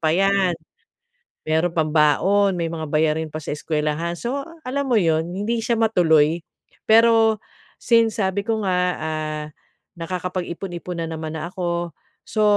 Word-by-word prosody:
pa 155 Hz, -1 st, +2 dB
'yan. 195 Hz, -3 st, +2 dB, 0.9 s
Meron 160 Hz, +3 st, +1 dB
pang 155 Hz, -1 st, +1 dB
baon 185 Hz, +6 st, +3 dB
may 170 Hz, -, -1 dB
mga 160 Hz, -2 st, -5 dB
bayarin 155 Hz, +1 st, +1 dB
pa 155 Hz, -, -6 dB
sa 150 Hz, -1 st, -5 dB
eskwelahan. 155 Hz, +3 st, -2 dB
So, 265 Hz, +7 st, -3 dB
ah, 330 Hz, +2 st, -12 dB
alam 275 Hz, +1 st, -2 dB
mo 235 Hz, -, +4 dB
'yon? 165 Hz, -2 st, +1 dB
Hindi 220 Hz, +5 st, -2 dB
siya 230 Hz, 0 st, 0 dB
matuloy. 170 Hz, -7 st, +3 dB, 0.5 s
Pero, 225 Hz, -1 st, +5 dB, 0.4 s
since 230 Hz, -2 st, +2 dB
sabi 195 Hz, 0 st, 0 dB
ko 220 Hz, 0 st, -2 dB
nga, 180 Hz, -1 st, +1 dB, 0.2 s
ah, 155 Hz, -1 st, -3 dB, 0.5 s
nakakapag-ipon-ipon 180 Hz, 0 st, -4 dB
na 165 Hz, -, -3 dB
naman 160 Hz, 0 st, -5 dB
na 170 Hz, +3 st, -5 dB
ako. 175 Hz, -2 st, -2 dB, 0.3 s
So, 215 Hz, -, -2 dB
175 Hz, 150 wpm, -22 LUFS, 160-215 Hz, 0.9 s, Pero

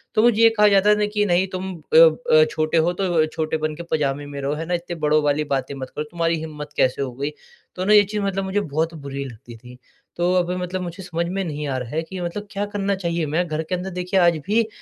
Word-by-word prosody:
तो 215 Hz, -, +5 dB
मुझे 230 Hz, -2 st, +4 dB
ये 230 Hz, -, +8 dB
कहा 210 Hz, 0 st, +6 dB
जाता 205 Hz, +1 st, +5 dB
था 210 Hz, -, +1 dB
कि, 210 Hz, 0 st, 0 dB
"नहीं, 185 Hz, 0 st, +2 dB
तुम 185 Hz, 0 st, -4 dB, 0.2 s
अ -, -, +7 dB
अ, 485 Hz, -1 st, +6 dB
छोटे 155 Hz, +1 st, 0 dB
हो, 170 Hz, +2 st, +3 dB
तो 175 Hz, -4 st, +1 dB
छोटेपन 155 Hz, 0 st, -2 dB
के 170 Hz, -, -7 dB
पजामे 145 Hz, -2 st, 0 dB
में 145 Hz, -1 st, -7 dB
रहो।" 140 Hz, +2 st, -1 dB
है 160 Hz, +2 st, -4 dB
ना? 175 Hz, -, -3 dB
"इतने 175 Hz, 0 st, -3 dB
बड़ों 150 Hz, +1 st, +4 dB
वाली 145 Hz, +1 st, +1 dB
बातें 135 Hz, +1 st, -3 dB
मत 130 Hz, -1 st, -6 dB
करो। 150 Hz, -, -2 dB
तुम्हारी 165 Hz, -1 st, 0 dB
हिम्मत 150 Hz, -2 st, -7 dB
कैसे 130 Hz, +1 st, +2 dB
हो 135 Hz, -, -2 dB
गई?" 140 Hz, +4 st, -3 dB, 0.4 s
तो 185 Hz, +1 st, -3 dB
ना, 210 Hz, -, +4 dB
ये 205 Hz, -1 st, +8 dB
चीज़ 205 Hz, +1 st, -3 dB
मतलब 195 Hz, -1 st, -1 dB
मुझे 190 Hz, +2 st, 0 dB
बहुत 160 Hz, -1 st, -2 dB
बुरी 140 Hz, -2 st, -6 dB
लगती 120 Hz, -1 st, -11 dB
थी। 125 Hz, +2 st, -14 dB, 0.4 s
तो 175 Hz, +1 st, +1 dB
अभी 180 Hz, 0 st, +1 dB
मतलब 180 Hz, +1 st, -3 dB
मुझे 175 Hz, +2 st, -6 dB
समझ 170 Hz, -1 st, -2 dB
में 195 Hz, +2 st, -2 dB
नहीं 150 Hz, -3 st, -4 dB
आ 130 Hz, -1 st, -1 dB
रहा 125 Hz, -2 st, -5 dB
है 160 Hz, +5 st, -1 dB
कि 185 Hz, +3 st, -8 dB
मतलब 205 Hz, +4 st, -4 dB
क्या 205 Hz, 0 st, -2 dB
करना 200 Hz, -1 st, -1 dB
चाहिए। 170 Hz, -3 st, -2 dB
मैं 160 Hz, +4 st, 0 dB
घर 155 Hz, -1 st, -2 dB
के 180 Hz, -, -2 dB
अंदर, 180 Hz, +1 st, -4 dB
देखिए, 180 Hz, +1 st, -1 dB
आज 170 Hz, -2 st, +4 dB
भी 220 Hz, +2 st, +2 dB
170 Hz, 260 wpm, -22 LUFS, 150-195 Hz, 0.4 s, ये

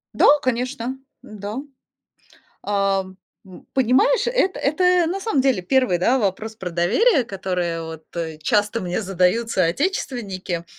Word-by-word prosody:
Да, -, -, +5 dB
конечно, 255 Hz, 0 st, -2 dB, 0.3 s
м-да. 210 Hz, 0 st, -7 dB, 1.1 s
Ам, 195 Hz, -2 st, -1 dB, 0.3 s
м, 185 Hz, -, -14 dB
понимаешь, 265 Hz, -, +3 dB
это 480 Hz, -6 st, +1 dB
это 355 Hz, +4 st, +3 dB
на 370 Hz, +4 st, -2 dB
самом 385 Hz, -10 st, 0 dB
деле 260 Hz, -8 st, +1 dB
1, 250 Hz, -2 st, +2 dB
да, 245 Hz, +9 st, +2 dB
вопрос 215 Hz, +1 st, -2 dB
про 190 Hz, -, -5 dB
доверие, 240 Hz, -, +3 dB
которое 180 Hz, -5 st, -3 dB
от 160 Hz, -1 st, -8 dB
э, 160 Hz, -2 st, -3 dB
часто 210 Hz, +5 st, +1 dB
мне 180 Hz, +2 st, -2 dB
задают 195 Hz, +3 st, +1 dB
соотечественники. 190 Hz, -, -1 dB
215 Hz, 130 wpm, -22 LUFS, 185-265 Hz, 1.1 s, Да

